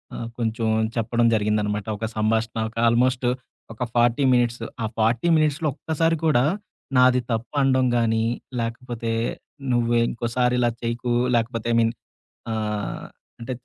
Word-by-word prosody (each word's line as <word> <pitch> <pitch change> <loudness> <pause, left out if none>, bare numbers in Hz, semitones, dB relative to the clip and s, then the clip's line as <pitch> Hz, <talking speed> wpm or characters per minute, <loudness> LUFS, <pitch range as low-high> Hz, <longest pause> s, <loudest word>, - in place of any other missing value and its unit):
ఆహ్, 115 - -5
కొంచెం 115 0 -1 0.3
చెప్పడం 115 +1 +1
జరిగిందనమాట. 105 -1 0
ఒక 110 - -3
సంభాషణ, 110 +1 0
ఒక 115 - -17
ఆల్మోస్ట్ 125 +2 +2 0.5
ఒక 115 - -4
40 120 +3 +3
మినిట్సు. 120 -1 +1 0.2
ఆ - - +1
40 115 +7 +2
మినిట్స్‌లో 155 +1 +1
ఒక్కసారి 165 +2 0
కూడా 140 -6 +4 0.5
నాది 125 0 +5
తప్పు 115 +4 -3
అనడం 130 -1 +3
గానీ, 115 -1 +2 0.4
లేకపోతే 115 0 -3 0.6
"నువ్వె 120 -1 +2
ఇంకోసారి 125 +1 0
ఇలా 120 -1 +3
చెయ్యకు" 120 +1 -2 0.2
లేకపోతే 115 0 -1
ఐ - - +3
మీన్ 115 0 +2 0.6
ఆహ్, 105 -1 -3 0.3
అంటే 120 +2 -5
120 Hz, 130 wpm, -23 LUFS, 115-125 Hz, 0.6 s, నాది